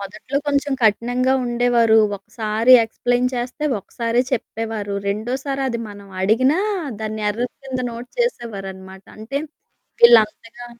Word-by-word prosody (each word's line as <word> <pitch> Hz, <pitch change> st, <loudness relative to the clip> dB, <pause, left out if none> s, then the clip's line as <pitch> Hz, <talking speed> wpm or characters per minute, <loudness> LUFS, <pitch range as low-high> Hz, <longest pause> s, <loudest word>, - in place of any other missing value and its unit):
మొదట్లో 210 Hz, +7 st, -6 dB
కొంచెం 285 Hz, 0 st, 0 dB
కఠినంగా 245 Hz, +4 st, +2 dB
ఉండేవారు. 240 Hz, -2 st, +3 dB, 0.2 s
ఒకసారి 220 Hz, +4 st, +1 dB
ఎక్స్‌ప్లెయిన్ 245 Hz, +2 st, 0 dB
చేస్తే, 250 Hz, +5 st, -4 dB, 0.2 s
ఒకసారే 235 Hz, +4 st, -1 dB
చెప్పేవారు. 220 Hz, -3 st, -3 dB
రెండోసారి 260 Hz, +7 st, -2 dB
అది 235 Hz, -1 st, -3 dB
మనం 200 Hz, -1 st, -11 dB, 0.2 s
అడిగినా 255 Hz, -, +3 dB, 0.4 s
దాన్ని 215 Hz, 0 st, -4 dB
ఎర్రర్ 240 Hz, +4 st, -3 dB
కింద 260 Hz, -1 st, -3 dB
నోట్ 235 Hz, +2 st, -9 dB
చేసేవారన్నమాట. 195 Hz, -, -4 dB
అంటే 245 Hz, +6 st, -4 dB, 0.7 s
ఈళ్ళంతగా 230 Hz, +1 st, +3 dB
235 Hz, 110 wpm, -20 LUFS, 215-250 Hz, 0.7 s, ఉండేవారు